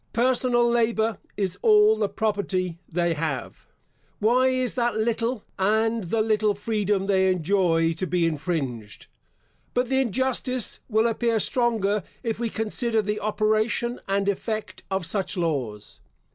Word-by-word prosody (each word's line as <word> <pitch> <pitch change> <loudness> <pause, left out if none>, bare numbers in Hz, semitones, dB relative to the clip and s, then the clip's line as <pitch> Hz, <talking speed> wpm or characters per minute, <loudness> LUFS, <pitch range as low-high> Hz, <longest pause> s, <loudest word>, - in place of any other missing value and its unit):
Personal 240 0 +3
labour 230 -2 +1 0.2
is 190 -2 -2
all 215 0 +6
the 215 -2 -1
property 195 -5 -1
they 170 0 +1
have. 150 -4 -4 0.5
Why 245 +5 +3
is 255 -1 0
that 240 -3 0
little, 230 +1 -1
and 220 +2 +1
the 215 +5 +1
little 215 -1 +1
freedom 205 -2 -1
they 190 -1 +3
enjoy, 170 -2 +2
to 185 +3 -3
be 175 0 +1
infringed? 140 - -3 0.7
But 245 0 +1
the 265 0 +3
injustice 255 0 -1
will 220 0 +2
appear 230 0 +1
stronger, 215 -3 +1 0.2
if 225 -2 -2
we 235 -1 -1
consider 220 +1 -1
the 210 +1 -2
operation 215 +3 0
and 195 0 0
effect 215 +2 -3
of 190 -2 -1
such 190 +2 -2
laws. 125 - -3
215 Hz, 135 wpm, -25 LUFS, 185-230 Hz, 0.7 s, all